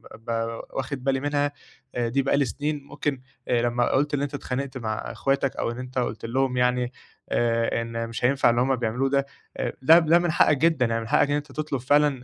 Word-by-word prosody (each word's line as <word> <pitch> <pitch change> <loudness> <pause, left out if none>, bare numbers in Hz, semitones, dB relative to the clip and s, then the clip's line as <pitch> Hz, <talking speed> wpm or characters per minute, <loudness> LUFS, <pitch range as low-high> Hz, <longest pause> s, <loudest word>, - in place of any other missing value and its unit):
ب 115 +1 -19
ب 115 0 -2
واخِد 140 -3 -4
بالي 135 0 +1
منها 145 0 0 0.4
أ 120 -1 0
دي 135 +4 +1
بقى 135 +1 +1
لي 140 - +3
سنين، 145 +6 -3
ممكن 140 -2 -3 0.3
آآ 120 -1 +2
لمّا 120 0 +1
قُلت 145 +2 +1
إن 140 - +1
أنت 145 0 -3
اتخانقت 135 -1 -4
مع 110 -3 -2
إخواتك 135 +2 -1
أو 115 - -1
إن 120 - -7
أنت 130 0 -7
قُلت 115 -2 -3
لهم 125 +2 0
يعني 125 0 +1 0.4
آآ، 115 0 +1
إن 115 0 -4
مش 115 - -2
هينفَع 135 -1 +4
اللي 120 +1 +2
هُم 135 +1 +2
بيعملوه 125 +3 -1
ده، 140 0 +1 0.3
أ - - -1
ده 160 +6 +8
ده 165 +1 +4
من 175 -2 0
حقّك 150 -2 +4
جدًا، 155 -4 +3
يعني 115 0 -1
من 115 - -7
حقّك 140 - +3
إن 145 - +2
أنت 145 -1 -4
تطلُب 150 -1 -3
فعلًا 145 -1 +2
130 Hz, 225 wpm, -25 LUFS, 120-145 Hz, 0.4 s, ده